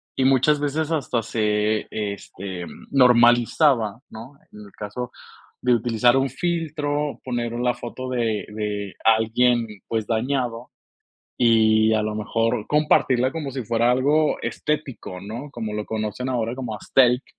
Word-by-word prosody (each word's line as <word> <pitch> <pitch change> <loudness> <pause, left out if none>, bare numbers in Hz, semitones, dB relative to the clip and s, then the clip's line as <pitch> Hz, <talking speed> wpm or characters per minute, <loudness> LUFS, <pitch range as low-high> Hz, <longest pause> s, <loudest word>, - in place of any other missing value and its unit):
y 130 - +1
muchas 135 +3 +4
veces 150 +2 -1
hasta 135 -7 0
se 105 -1 0
este, 100 -3 -5
mm, - - -13
normalizaba, 120 -2 +4
¿no? 115 +5 -10 0.2
En 105 - -13
el 100 -1 -13
caso 105 +4 -5 0.5
de 125 - +4
utilizar 120 +2 +2
un 135 +1 +2
filtro, 150 -3 -2
poner 120 -2 -3
la 125 +1 0
foto 130 +2 -7
de 115 -4 -1
de 105 -2 -3
alguien, 115 +2 +3 0.2
pues, 110 -2 -2
dañado. 120 0 -2 0.7
Y 110 -2 +4
a 110 - +1
lo 105 0 -2
mejor 115 +1 -1
compartirla 135 -4 +2
como 150 -4 -4
si 130 -2 -5
fuera 115 +2 +2
algo 145 +5 +2
estético, 140 -11 -4
¿no? 115 +9 -7
Como 115 -5 -5
lo 105 0 -3
conocen 110 +3 -3
ahora 120 -2 -1
como 125 -4 -5
aesthetic. 125 +4 +3
120 Hz, 140 wpm, -23 LUFS, 110-135 Hz, 0.7 s, muchas